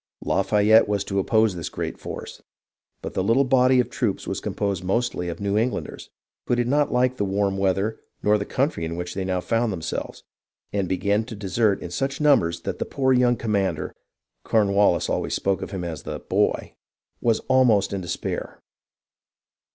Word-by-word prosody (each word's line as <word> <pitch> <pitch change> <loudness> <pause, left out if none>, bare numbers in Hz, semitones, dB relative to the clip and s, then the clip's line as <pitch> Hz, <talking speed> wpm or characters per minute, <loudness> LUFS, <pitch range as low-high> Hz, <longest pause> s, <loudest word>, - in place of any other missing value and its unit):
Lafayette 105 +2 +4
was 100 -1 0
to 100 -1 -1
oppose 110 +1 +3
this 85 - -4
great - - -5
force; - - -8 0.6
but - - -5
his 95 - +1
little 115 +7 +3
body 130 -1 +4
of 125 - +2
troops 110 -6 -1
was - - -3
composed 100 -3 -2
mostly 95 -2 -1
of 85 - -6
New 100 0 -1
Englanders, 120 +3 -3 0.4
who 120 - +2
did 120 0 0
not 145 +3 +2
like 125 +1 +2
the - - 0
warm 100 0 0
weather 95 +3 0 0.2
nor 105 0 +3
the - - -1
country 135 - -1
in 80 +1 -3
which 90 +1 -5
they 95 - -3
now 95 -1 -1
found 115 +4 0
themselves, 85 -4 -5 0.5
and 100 -3 -1
began 100 +3 +1
to 115 -1 -8
desert 105 +1 0
in 85 - -6
such 135 +9 -2
numbers 135 - +3
that - - -4
the - - +1
poor 130 -1 +1
young 125 -1 +4
commander 105 -5 -1 0.5
(Cornwallis 100 -4 +3
always - - -1
spoke 100 -1 0
of - - -5
him 95 -3 -5
as 80 -4 -5
"the - - -5
boy - - 0 0.2
") - - -52
was 115 -2 +2
almost 120 -7 +3
in 95 - -2
despair. 85 -1 -4
105 Hz, 180 wpm, -24 LUFS, 95-120 Hz, 0.6 s, Lafayette